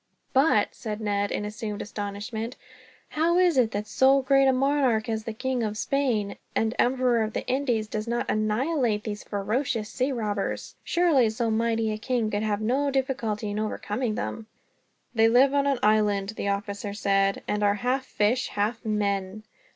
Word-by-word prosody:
"But," 265 Hz, -6 st, +3 dB
said 215 Hz, -1 st, -5 dB
Ned, 205 Hz, -1 st, 0 dB
in 210 Hz, -, -2 dB
assumed 210 Hz, 0 st, -5 dB
astonishment, 210 Hz, +3 st, -5 dB, 0.5 s
"how 335 Hz, +3 st, +1 dB
is 360 Hz, -3 st, +4 dB
it 250 Hz, -4 st, +4 dB
that 210 Hz, -1 st, -3 dB
so 265 Hz, +4 st, +3 dB
great 275 Hz, 0 st, +4 dB
a -, -, +6 dB
monarch 260 Hz, -4 st, +2 dB
as 220 Hz, -1 st, -2 dB
the 225 Hz, -, -3 dB
King 255 Hz, +2 st, -2 dB
of 215 Hz, -1 st, -2 dB
Spain, 235 Hz, -7 st, 0 dB, 0.2 s
and 220 Hz, 0 st, +1 dB
Emperor 250 Hz, -2 st, +2 dB
of 220 Hz, 0 st, -2 dB
the -, -, -3 dB
Indies, 250 Hz, -4 st, 0 dB
does 215 Hz, +1 st, -4 dB
not 235 Hz, +1 st, -1 dB
annihilate 215 Hz, +1 st, 0 dB
these 210 Hz, -1 st, -5 dB
ferocious 220 Hz, +2 st, -2 dB
sea 260 Hz, +4 st, -1 dB
robbers? 210 Hz, -5 st, -3 dB
Surely 315 Hz, -10 st, +3 dB
so 225 Hz, +1 st, -1 dB
mighty 225 Hz, 0 st, +1 dB
a 215 Hz, -, -4 dB
king 230 Hz, -2 st, -1 dB
could 205 Hz, -, -1 dB
have 215 Hz, -1 st, -1 dB
no 265 Hz, +6 st, +1 dB
difficulty 250 Hz, -6 st, -1 dB
in 205 Hz, -, -2 dB
overcoming 215 Hz, +1 st, -2 dB
them." 220 Hz, 0 st, -4 dB, 0.7 s
"They 225 Hz, -1 st, +4 dB
live 260 Hz, +4 st, +5 dB
in 280 Hz, 0 st, +2 dB
an 275 Hz, -2 st, +2 dB
island," 210 Hz, -2 st, +2 dB
the 220 Hz, -2 st, -4 dB
officer 200 Hz, 0 st, -3 dB
said, 195 Hz, -1 st, +1 dB
"and 210 Hz, 0 st, -1 dB
are 205 Hz, 0 st, +3 dB
half 250 Hz, +5 st, 0 dB
fish, 245 Hz, 0 st, 0 dB
half 215 Hz, +4 st, -2 dB
men." 205 Hz, -2 st, -1 dB
220 Hz, 175 wpm, -26 LUFS, 210-255 Hz, 0.7 s, a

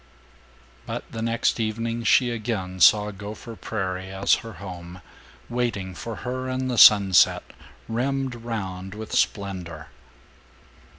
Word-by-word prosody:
But -, -, -4 dB
the 115 Hz, -, -5 dB
next 115 Hz, +1 st, 0 dB
evening 115 Hz, +1 st, -2 dB
she 125 Hz, 0 st, +4 dB
again 105 Hz, -5 st, -4 dB
saw 105 Hz, +3 st, +6 dB
Gopher 105 Hz, +3 st, -9 dB
Prairie 95 Hz, -4 st, -4 dB
as 95 Hz, +1 st, +1 dB
her 115 Hz, -1 st, -9 dB
home, 90 Hz, -1 st, -9 dB, 0.5 s
waiting 115 Hz, -6 st, -2 dB
for 115 Hz, +5 st, -6 dB
her 130 Hz, +1 st, -3 dB
in 130 Hz, 0 st, -2 dB
the 120 Hz, -3 st, 0 dB
sunset, 100 Hz, -3 st, +7 dB, 0.4 s
rimmed 135 Hz, +3 st, -1 dB
round 100 Hz, -5 st, -6 dB
with 110 Hz, 0 st, -8 dB
splendor. 90 Hz, -6 st, -2 dB
110 Hz, 120 wpm, -24 LUFS, 95-115 Hz, 0.5 s, sunset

